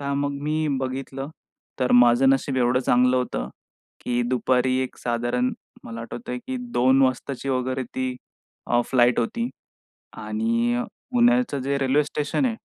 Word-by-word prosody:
तर 140 0 -2
मग 140 0 -1
मी 155 +1 0
बघितलं 135 +1 -4 0.5
तर 125 - +2
माझं 120 +2 +6
नशीब 135 0 0
एवढं 125 +1 +2
चांगलं 125 0 +3
होतं 125 - -2 0.5
की 120 0 -1
दुपारी 130 0 +1
एक 130 - -6
साधारण 120 +1 -1 0.3
मला 115 0 -7
आठवतंय 240 - -6
की 260 0 -3 0.2
2 130 +2 +4
वाजताची 130 +1 -1
वगैरे 130 0 -1
ती 130 -1 -2 0.5
अ, 120 0 +3
फ्लाइट 120 -1 +3
होती 235 - -2 0.7
आणि 235 +2 0 0.3
पुण्याचं 245 - +3
जे 140 +2 -1
रेल्वे 135 +2 +2
स्टेशन 150 - -1
आहे, 230 -3 0
130 Hz, 140 wpm, -24 LUFS, 125-145 Hz, 0.7 s, माझं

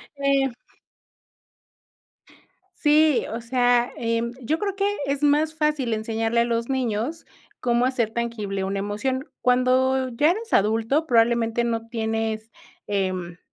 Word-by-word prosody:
eh. 275 -1 +1 2.3
Sí, 305 -1 +4
o 230 +1 -4
sea, 245 0 +2
em, 230 0 -1
yo 295 +7 0
creo 400 +1 -3
que 395 0 0 0.2
es 280 +1 -2
más 300 +2 +3
fácil 300 -6 0
enseñarle 225 +1 -1
a - - +2
los 230 0 -1
niños 255 +4 -2 0.3
cómo 240 0 +2
hacer 250 -4 0
tangible 220 -4 -3
una 195 +1 -2
emoción, 255 +7 -3
cuando 255 +1 +2
ya 290 +7 +3
eres 450 +5 -5
adulto, 225 +9 +2
probablemente 235 -2 +2
no 230 -1 -2
tienes, 225 -1 -2 0.4
em, 185 -3 -2
235 Hz, 125 wpm, -24 LUFS, 225-270 Hz, 2.3 s, Sí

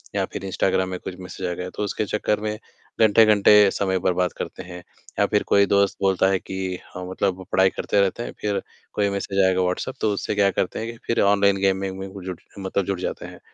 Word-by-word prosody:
या - - +1
फिर - - -5
इंस्टाग्राम 95 0 0
में 90 - -4
कुछ 90 - -7
मैसेज 90 0 -6
गया, 90 0 -4
तो 105 - -5
उसके 105 +1 -2
चक्कर 105 +1 -1
में, 105 0 -3 0.4
घंटे-घंटे 105 -2 +6
समय 95 -2 0
बर्बाद 90 -1 0
करते - - -6
हैं 90 0 -9 0.4
या - - +5
फिर - - +1
कोई 100 0 +5
दोस्त 100 0 +2
बोलता 95 -1 +3
है 95 -1 +1
कि 95 -1 -4 0.2
अ, - - -5
मतलब 95 0 -1
पढ़ाई 95 0 +4
करते 100 +1 0
रहते 100 +4 0
हैं, - - -6
फिर 100 -2 -1 0.3
कोई 100 -1 +1
मैसेज 100 0 -2
आएगा 95 0 +2
व्हाट्सएप, 90 +8 -2
तो 105 - +2
उससे 100 - -3
क्या 100 -1 +4
करते 90 - -2
हैं 115 - -4
कि 115 - -13
फिर 115 - +1
ऑनलाइन 100 0 +4
गेम 95 -1 +2
वेम 95 -1 -4
में 95 - -5 0.2
जुट 90 -2 -6 0.2
मतलब 95 0 -1
जुट 95 -2 -2
जाते - - -4
हैं। - - -11
95 Hz, 220 wpm, -23 LUFS, 95-100 Hz, 0.4 s, घंटे-घंटे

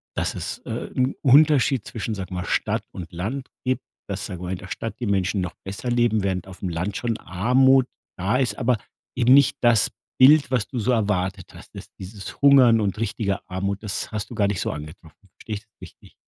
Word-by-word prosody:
dass - - -1
es, - - -4
äh, - - -5
'n 130 +1 +1
Unterschied 140 -3 +4
zwischen, 110 -2 -4
sag 95 -1 -6
mal, 90 -1 -4
Stadt - - -1
und 90 0 -8
Land 115 +11 -4
gibt, 130 0 -1 0.3
dass, 100 +1 -3
sagen 90 -3 -6
wir - - -5
mal, 90 - -4
in 95 - -3
der 95 - -10
Stadt 110 +5 -5
die 120 - -3
Menschen 95 -1 0
noch 90 -1 -4
besser 100 +6 -5
leben, 120 -4 +2
während 95 -2 -2
aufm 95 0 -6
Land 90 +4 -3
schon 115 -2 -2
Armut 130 +7 +3 0.3
da 100 +7 +1
ist, 130 -2 0
aber 125 -2 +1 0.4
eben 125 +1 +5
nicht 140 -1 +5
das 115 -4 +4 0.3
Bild, 145 +3 +7
was 125 -5 0
du 125 - -4
so 110 +3 +1
erwartet 100 -5 -1
hast. - - -15
Das - - -10
dieses 95 +1 -9
Hungern 130 -5 +7
und 100 0 -1
richtige 100 -2 -2
Armut, 100 +2 -3
das 100 -2 -3
hast 105 -2 -4
du 120 - -7
gar 105 -3 +2
nicht 100 -2 -1
so - - -1
angetroffen. 80 +5 -11
Verstehe 110 - -6
ich 100 - -6
das - - -51
richtig? - - -14
105 Hz, 215 wpm, -23 LUFS, 95-125 Hz, 0.4 s, Bild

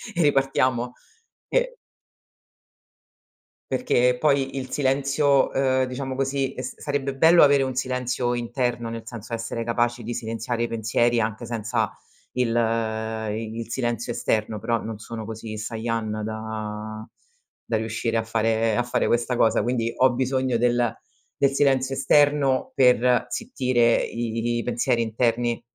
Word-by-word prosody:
e 170 - +1
ripartiamo 130 -3 +2 0.6
che - - +1 2.0
Perché 125 - +2
poi 140 -2 +1
il 130 -1 -4
silenzio 140 +1 +2
ehm, 130 -1 +2
diciamo 130 +1 -4
così, 135 0 -1
s 125 - -7
sarebbe 140 -2 -2
bello 165 +5 +6
avere 140 -1 +6
un 130 -1 -2
silenzio 125 -1 -1
interno, 120 -1 -2
nel 115 0 -6
senso 115 -1 -8
essere 115 0 -3
capaci 120 +1 0
di 120 +2 -4
silenziare 115 0 -3
i - - 0
pensieri 115 +1 +1
anche 110 +2 -3
senza 110 -1 -1 0.4
il 125 -2 +1 0.8
i 110 +1 -4
il 115 - -6
silenzio 120 -1 -2
esterno, 110 -2 -1
però 115 +1 -1
non 110 -1 -5
sono 110 0 -7
così 110 0 -7
Sayan 110 0 -3
da 110 0 -5 0.6
da 115 - -1
riuscire 115 +1 -2
a 115 - 0
fare 115 0 +1
a 120 - +2
fare 120 - 0
questa 120 +1 +1
cosa, 110 - +3
quindi 120 -2 0
ho 130 -1 +4
bisogno 130 0 0
del 120 -1 +2 0.4
del 140 -1 +3
silenzio 135 -1 +2
esterno 140 0 +3
per 125 -1 +4
zittire 130 - +1
i 115 0 -2
pensieri 120 0 +1
interni. 115 +1 0
120 Hz, 135 wpm, -24 LUFS, 115-130 Hz, 2.0 s, bello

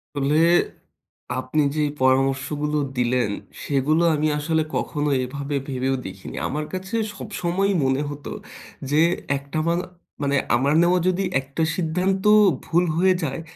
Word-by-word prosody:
ফলে, 140 +1 +1 1.0
আপনি 130 +4 0
যেই 150 -1 +1
পরামর্শ 130 0 +3 0.2
গুলো 150 0 0 0.2
দিলেন, 125 -2 +1 0.3
সেগুলো 150 +4 +1
আমি 155 +1 +1
আসলে 160 +1 +1
কখনো 150 -1 -1
এভাবে 140 +3 -4
ভেবেও 135 -1 -1
দেখিনি। 95 0 -8
আমার 150 +2 -3
কাছে 190 +3 -4 0.2
সবসময়ই 195 +2 -1
মনে 130 +1 +1
হত, 145 0 -8 0.7
যে 150 +2 +4 0.4
একটানা 155 +4 -2 0.5
মান 140 -1 0 0.2
আমার 135 +4 +2
নেওয়া 175 +1 +3
যদি 185 +1 +1 0.2
একটা 140 +4 -3
সিদ্ধান্ত 185 +3 0 0.4
ভুল 175 +2 +2
হয়ে 185 +2 +4
যায়, 140 0 -3
150 Hz, 130 wpm, -23 LUFS, 135-170 Hz, 1.0 s, যে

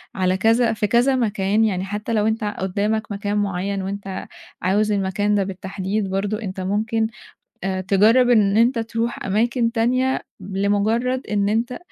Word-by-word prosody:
على 185 0 +1
كذا 225 +3 +3
في 210 -1 -1
كذا 245 +5 +3
مكان، 215 -2 +1
يعني 190 -3 -1
حتى 210 +3 -4
لو 215 -1 +2
أنت 220 0 -1
قدامك 210 +2 -2
مكان 205 +1 -2
معيّن 195 0 -1
وأنت 195 0 -5 0.3
عاوز 205 +4 +1
المكان 205 +1 0
ده 200 - +2
بالتحديد، 190 +1 -3
برضه 200 +3 -2
أنت 190 -3 -5
ممكن 220 +4 0 0.6
آآ، 190 -1 -1
تجرّب 215 +6 +4
إن 210 -3 +4
أنت 235 +2 +3
ترُوح 230 +1 -3
أماكن 230 +4 +1
تانية 255 +3 +1 0.2
لمجرّد 205 +6 0
إن 200 -1 0
أنت 235 +3 -1
210 Hz, 150 wpm, -21 LUFS, 195-225 Hz, 0.6 s, تجرّب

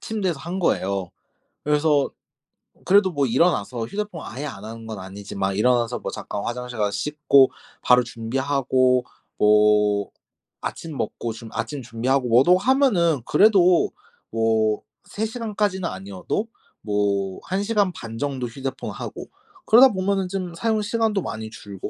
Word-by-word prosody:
침대에서 190 -8 -2
한 175 +3 -5
거예요. 100 - 0 0.5
그래서 150 -1 +2 0.8
그래도 190 -1 +4
뭐 145 -3 +1
일어나서 120 - +1
휴대폰 200 - -5
아예 135 +5 -6
안 105 -9 -7
하는 115 0 -9
건 110 -3 -6
아니지만 95 0 -4
일어나서 120 +2 +2
뭐 - - -5
잠깐 100 - -5
화장실 125 0 -5
가서 105 -1 +1
씻고 145 -2 +3 0.3
바로 125 0 +5
준비하고 130 +1 0 0.3
뭐 105 -1 +4 0.5
아침 160 -4 -6
먹고 115 -1 -3
준 115 0 -10
아침 145 -3 -4
준비하고 125 +3 0
뭐도 135 +10 +6
하면은 195 - +2
그래도 185 -4 +4 0.4
뭐 110 -1 +1 0.2
3 220 - -3
시간까지는 210 -5 -2
아니어도 95 - -4 0.3
뭐 100 -2 -1
1 190 +2 -2
시간 205 -3 +1
반 115 -4 -8
정도 135 -3 -2
휴대폰하고 130 +2 -6 0.4
그러다 245 +5 +8
보면은 190 0 0
좀 185 -3 -4
사용 220 +2 0
시간도 215 -2 0
많이 110 -4 -5
줄고 100 -3 -8
130 Hz, 300 characters per minute, -23 LUFS, 110-185 Hz, 0.8 s, 그러다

